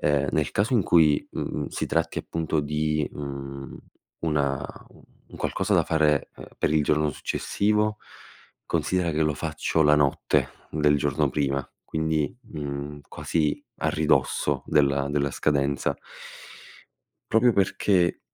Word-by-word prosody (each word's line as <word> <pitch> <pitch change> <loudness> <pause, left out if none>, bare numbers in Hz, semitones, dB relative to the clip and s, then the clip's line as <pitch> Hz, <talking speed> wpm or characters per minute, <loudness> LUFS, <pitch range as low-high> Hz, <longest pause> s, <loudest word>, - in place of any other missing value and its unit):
Ehm, 75 -1 +2
nel 75 -5 +1
caso 105 +6 0
in 115 - +4
cui, 80 -5 +4
mhmm, - - -3
si - - -3
tratti - - 0
appunto 80 -1 -2
di, 75 0 -1
mhmm, 70 -1 -7 0.4
una 70 -4 0 0.6
un - - -11
qualcosa - - 0
da - - +4
fare, 75 -3 +2
uhm, - - -10
per - - +1
il 80 - +3
giorno 75 +1 +2
successivo, 105 +8 0 0.7
considera 90 -3 0
che 80 +1 +1
lo 75 -1 +1
faccio 80 - 0
la 75 0 +5
notte 75 -2 +2 0.2
del 75 -1 +3
giorno - - +1
prima, 70 -2 -1 0.2
quindi, 80 - -1 0.2
mhmm, 75 0 -5
quasi 75 -3 -1 0.2
a - - +1
ridosso 70 -3 +1
della 70 -1 +2
della 70 -1 0
scadenza. 70 -1 0 1.4
Proprio 115 +1 +5
perché, 95 -2 +2
75 Hz, 130 wpm, -25 LUFS, 70-80 Hz, 1.4 s, la